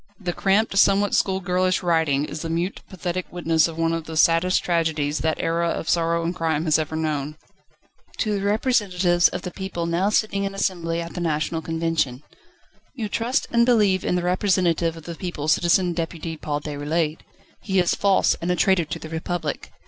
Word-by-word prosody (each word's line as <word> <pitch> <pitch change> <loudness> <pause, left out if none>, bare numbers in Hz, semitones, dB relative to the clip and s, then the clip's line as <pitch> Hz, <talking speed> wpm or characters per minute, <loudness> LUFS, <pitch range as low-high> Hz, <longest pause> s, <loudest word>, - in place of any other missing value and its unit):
The 180 -3 -3
cramped, 200 +3 +1
somewhat 200 0 +4
schoolgirlish 185 -1 +1
writing 160 -5 +2
is 150 0 -6
the 165 - -4
mute, 170 +4 -2
pathetic 180 0 -4
witness 165 -2 +2
of 165 -1 -8
one 165 0 +1
of 165 -1 -3
the 160 -1 -6
saddest 165 +3 +3
tragedies, 160 -4 0
that 160 0 -1
era 170 +1 0
of 165 - -3
sorrow 170 0 +1
and 170 +1 -1
crime 160 -1 -1
has 155 -1 +3
ever 155 0 -3
known: 155 -2 -2 0.4
/* - - -29
To 215 -2 0
the 200 - -1
Representatives 200 -5 +2
of 180 - -5
the 180 - -5
People 190 -3 -4
now 170 +4 +1
sitting 210 -2 0
in 195 0 -3
Assembly 170 -4 -1
at 170 0 -7
the 175 - -5
National 160 0 -1
Convention 165 -5 -1 0.7
You 220 -5 -4
trust 240 +6 0
and 235 0 +4
believe 210 -6 +3
in - - 0
the 180 - -1
Representative 180 -3 +1
of 165 - -11
the 170 - -6
people: 165 -4 -5
Citizen 175 +2 +3
Deputy 165 -1 -4
Paul 150 -1 -3
Déroulède. 150 +2 -2 0.4
He 195 -1 -1
is 180 -2 +3
false, 200 -1 +3
and 170 - -2
a 180 - +2
traitor 180 -1 +2
to 150 - -5
the - - -9
Republic. 160 -1 -4
170 Hz, 190 wpm, -23 LUFS, 160-185 Hz, 0.7 s, somewhat